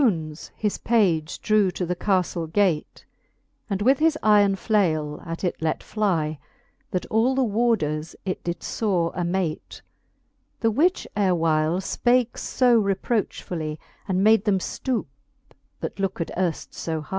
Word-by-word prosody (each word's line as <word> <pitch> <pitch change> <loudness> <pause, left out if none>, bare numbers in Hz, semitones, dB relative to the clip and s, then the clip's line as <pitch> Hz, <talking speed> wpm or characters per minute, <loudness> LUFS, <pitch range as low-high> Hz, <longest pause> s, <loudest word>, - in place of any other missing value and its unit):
Eftfbones 160 - 0
his 210 -2 -1
page 175 -9 +1
drew 215 -3 +3
to 180 0 -3
the 180 +1 -2
caftle 180 -4 0
gate, 185 -5 0 0.6
And 200 0 -1
with 260 +4 +4
his 315 0 +3
iron 205 -2 +5
flale 160 -9 0
at 165 +2 -5
it 180 - -2
let 160 -1 -1
flie, 165 -8 -1 0.5
That 185 - -2
all 230 +4 +3
the 265 - +2
warders 205 -9 0
it 185 - -3
did 170 -1 -4
fore 180 -7 0
amate, 175 -2 -3 0.8
The 225 -1 +3
which 330 - +2
erewhile 165 -4 +2
fpake 240 +4 +2
fb 240 -4 +2
reprochfully, 175 -7 -3 0.3
And 190 -1 +1
made 220 0 +5
them 205 -3 +3
ftoupe, 235 +5 -2 0.8
that - - -5
looked 190 -3 -2
earft 175 -3 -2
fb 160 -2 -4
hie. - - -18
190 Hz, 140 wpm, -24 LUFS, 165-220 Hz, 0.8 s, iron